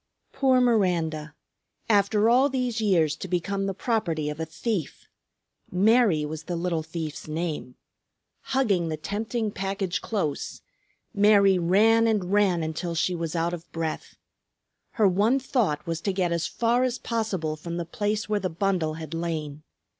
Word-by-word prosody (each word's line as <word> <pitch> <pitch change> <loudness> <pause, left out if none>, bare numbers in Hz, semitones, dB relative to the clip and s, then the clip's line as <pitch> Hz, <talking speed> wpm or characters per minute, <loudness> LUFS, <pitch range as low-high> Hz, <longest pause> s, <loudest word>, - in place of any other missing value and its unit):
Poor 260 -2 +3
Miranda! 170 - +1 0.5
After 205 0 +3
all 255 +4 +5
these 250 -4 -1
years 165 -8 +2
to - - -6
become 195 +3 -1
the 195 - -1
property 170 - -1
of 150 - -8
a 160 - -3
thief! 185 - -4 0.6
Mary 200 -4 +3
was 155 +1 -6
the 175 - -3
little 170 -1 -1
thief's 160 -2 -6
name. 155 -5 -4 0.7
Hugging 210 -11 +1
the 155 - -3
tempting 215 +6 -3
package 195 -1 -2
close, 180 -10 -3 0.5
Mary 200 -2 +5
ran 220 +6 +4
and 205 -5 0
ran 190 -5 +3
until 165 +2 -3
she 180 +3 +1
was 165 -1 -3
out 170 +1 0
of 170 -1 -8
breath. 165 -1 -4 0.8
Her 215 -5 +4
one 205 +8 +3
thought 230 - 0
was 165 -1 -3
to 195 - -1
get 185 -2 0
as 170 -1 0
far 235 +1 +1
as 255 -1 0
possible 210 -11 -2
from 170 +2 -6
the 170 - -3
place 210 +3 -2
where 210 -1 0
the 185 -1 -2
bundle 175 -3 -1
had 160 -1 -7
lain. 155 -3 -3
185 Hz, 155 wpm, -26 LUFS, 165-215 Hz, 0.8 s, all